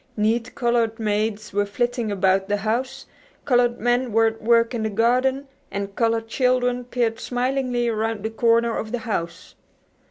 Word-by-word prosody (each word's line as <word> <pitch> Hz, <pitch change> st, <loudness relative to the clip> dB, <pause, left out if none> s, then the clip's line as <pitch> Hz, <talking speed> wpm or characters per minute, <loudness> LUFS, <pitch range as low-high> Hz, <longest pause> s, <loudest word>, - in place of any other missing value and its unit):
Neat 225 Hz, +3 st, 0 dB
colored 235 Hz, -2 st, 0 dB
maids 215 Hz, 0 st, -1 dB
were 205 Hz, +1 st, +2 dB
flitting 240 Hz, +1 st, -1 dB
about 190 Hz, -1 st, +2 dB
the 205 Hz, -, +1 dB
house, 225 Hz, +6 st, -2 dB, 0.4 s
colored 245 Hz, -2 st, +2 dB
men 245 Hz, +2 st, +1 dB
were 225 Hz, +1 st, +4 dB
at 225 Hz, 0 st, -1 dB
work 230 Hz, +1 st, +3 dB
in 235 Hz, -, -2 dB
the 220 Hz, -, -1 dB
garden, 255 Hz, +6 st, +1 dB, 0.2 s
and 200 Hz, 0 st, -5 dB
colored 225 Hz, -1 st, 0 dB
children 250 Hz, 0 st, +1 dB
peered 235 Hz, -2 st, -1 dB
smilingly 250 Hz, -1 st, -1 dB
around 220 Hz, -2 st, -2 dB
the 220 Hz, -, -2 dB
corner 230 Hz, 0 st, +2 dB
of 220 Hz, -, -4 dB
the 245 Hz, -, -1 dB
house. 170 Hz, -5 st, -4 dB
230 Hz, 160 wpm, -23 LUFS, 215-245 Hz, 0.4 s, were